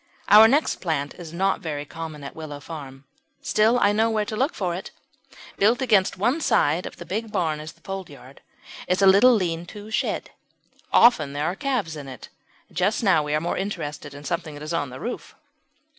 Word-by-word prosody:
Our 215 +2 +9
next 285 +6 +2
plant 150 -5 -2
is 170 -3 -10
not 190 +3 0
very 150 -4 -4
common 155 -1 -8
at 140 - -8
Willow 155 -3 -7
Farm; 140 -4 -9 0.4
still 215 +8 +2
I 205 -4 +4
know 220 +2 +2
where 215 -2 0
to 215 - -5
look 265 +7 0
for 180 -3 -2
it. 180 - -6 0.7
Built 220 +5 +3
against 215 -9 +2
one 245 - +1
side 165 - +2
of - - -9
the - - -9
big 220 +3 -4
barn 160 -5 -1
in 155 - -8
the - - -11
foldyard 150 -9 -8 0.5
is 180 +2 +1
a - - +7
little 200 +7 +7
lean 175 -4 -2
to 210 +2 -10
shed. - - -2 0.6
Often 155 - +5
there 145 +1 -2
are 175 +3 -1
calves 250 - -2
in 145 -2 -8
it; 130 - -10 0.4
but - - -16
just 195 +6 +1
now 190 -7 +4
we 150 0 -1
are - - +2
more 170 +3 -2
interested 150 -7 -5
in 145 - -10
something 160 +1 -4
that 145 - -9
is 155 +2 -4
on 145 -5 -1
the 130 +1 -9
roof. 245 - -6
175 Hz, 205 wpm, -24 LUFS, 150-210 Hz, 0.7 s, Our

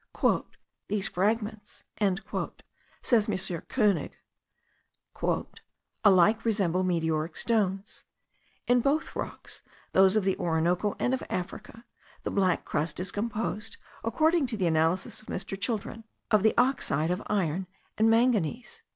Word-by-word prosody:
"These 205 -1 -1
fragments," 210 +2 -2 1.2
says 225 -4 +3
Mr. 185 -4 -3
Koenig, 210 -8 +1 1.9
"alike 205 +2 +5
resemble 195 -6 +1
meteoric 160 -3 0
stones; 200 -4 0 0.6
in 245 0 +4
both 290 +5 0
rocks, - - -5 0.3
those 190 +1 +5
of 215 - +3
the 190 0 +1
Orinoco 175 +4 +1
and 250 - 0
of 260 - -1
Africa, 190 +5 -5 0.4
the - - -2
black 190 -3 +1
crust 150 +2 -1
is 180 0 -1
composed, 220 0 -3 0.3
according 315 +5 +2
to 230 -2 -3
the 190 - 0
analysis 165 +3 +1
of 215 - -20
Mr. 195 - -4
Children, 225 0 -2 0.3
of 215 -2 +5
the 220 +2 +3
oxide 210 - +2
of 180 +3 -1
iron 185 -3 0 0.3
and 220 +1 +4
manganese." 235 - +1
205 Hz, 120 wpm, -28 LUFS, 180-225 Hz, 1.9 s, alike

